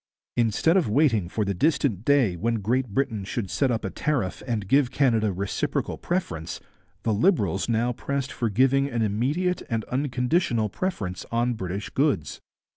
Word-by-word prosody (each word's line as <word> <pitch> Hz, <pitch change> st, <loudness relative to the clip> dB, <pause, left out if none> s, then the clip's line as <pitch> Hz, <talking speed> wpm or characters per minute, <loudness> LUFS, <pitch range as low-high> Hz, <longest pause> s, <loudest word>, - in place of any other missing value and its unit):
Instead 120 Hz, -, +3 dB
of 170 Hz, -, +1 dB
waiting 115 Hz, -, +2 dB
for 105 Hz, +2 st, -1 dB
the 100 Hz, -, 0 dB
distant 130 Hz, -, +1 dB
day 130 Hz, -9 st, +3 dB
when 115 Hz, +7 st, 0 dB
Great 120 Hz, +5 st, 0 dB
Britain 110 Hz, -1 st, -1 dB
should 100 Hz, 0 st, -4 dB
set 135 Hz, -, +1 dB
up 115 Hz, -3 st, -1 dB
a 95 Hz, -, -3 dB
tariff 135 Hz, -12 st, -1 dB
and 110 Hz, -5 st, -2 dB
give 135 Hz, +3 st, +4 dB
Canada 115 Hz, -6 st, +2 dB
reciprocal 95 Hz, +1 st, -2 dB
preference, 90 Hz, -, -3 dB, 0.4 s
the 110 Hz, -, +1 dB
Liberals 105 Hz, -, +2 dB
now 115 Hz, +2 st, +1 dB
pressed 140 Hz, +2 st, -3 dB
for 115 Hz, -, -1 dB
giving 135 Hz, +6 st, +3 dB
an 120 Hz, -3 st, -1 dB
immediate 140 Hz, -, 0 dB
and 115 Hz, -2 st, -1 dB
unconditional 125 Hz, -2 st, +1 dB
preference 100 Hz, -, -3 dB
on 120 Hz, +1 st, +1 dB
British 95 Hz, -2 st, -5 dB
goods. 135 Hz, -, 0 dB
120 Hz, 160 wpm, -25 LUFS, 105-140 Hz, 0.4 s, give